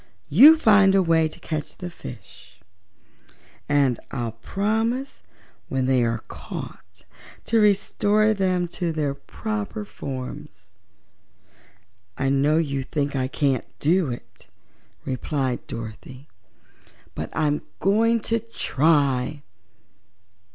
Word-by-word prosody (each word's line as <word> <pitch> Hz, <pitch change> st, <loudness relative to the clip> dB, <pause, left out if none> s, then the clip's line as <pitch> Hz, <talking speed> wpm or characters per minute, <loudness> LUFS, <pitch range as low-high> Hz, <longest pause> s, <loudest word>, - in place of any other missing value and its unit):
"You 275 Hz, -, +9 dB
find 205 Hz, -8 st, +5 dB
a 195 Hz, -, +4 dB
way 165 Hz, -2 st, +3 dB
to 155 Hz, -, -13 dB
catch 155 Hz, -2 st, -5 dB
the 180 Hz, -1 st, -6 dB
fish, 100 Hz, -, -12 dB, 1.1 s
and 140 Hz, -4 st, +2 dB
I'll 120 Hz, -2 st, -3 dB
promise 220 Hz, -, -2 dB, 0.5 s
when 130 Hz, -1 st, 0 dB
they 130 Hz, -2 st, +3 dB
are 115 Hz, -1 st, -1 dB
caught -, -, -9 dB, 0.4 s
to 230 Hz, -, +2 dB
restore 210 Hz, +1 st, +3 dB
them 185 Hz, -3 st, 0 dB
to 175 Hz, -1 st, -2 dB
their 150 Hz, -3 st, -1 dB
proper 215 Hz, +6 st, -5 dB
forms." 130 Hz, -9 st, -8 dB, 1.5 s
"I 135 Hz, -, 0 dB
know 140 Hz, +3 st, +3 dB
you 140 Hz, -4 st, 0 dB
think 140 Hz, +1 st, -2 dB
I 130 Hz, -1 st, 0 dB
can't 135 Hz, -2 st, 0 dB
do 170 Hz, 0 st, +2 dB
it," 120 Hz, -, -9 dB, 0.6 s
replied 130 Hz, -1 st, -2 dB
Dorothy, 115 Hz, +4 st, -8 dB, 0.9 s
"but 80 Hz, -, -5 dB
I'm 150 Hz, -1 st, 0 dB, 0.2 s
going 225 Hz, +4 st, +3 dB
to 230 Hz, +2 st, 0 dB
try." 145 Hz, -, +1 dB
155 Hz, 110 wpm, -24 LUFS, 130-205 Hz, 1.5 s, You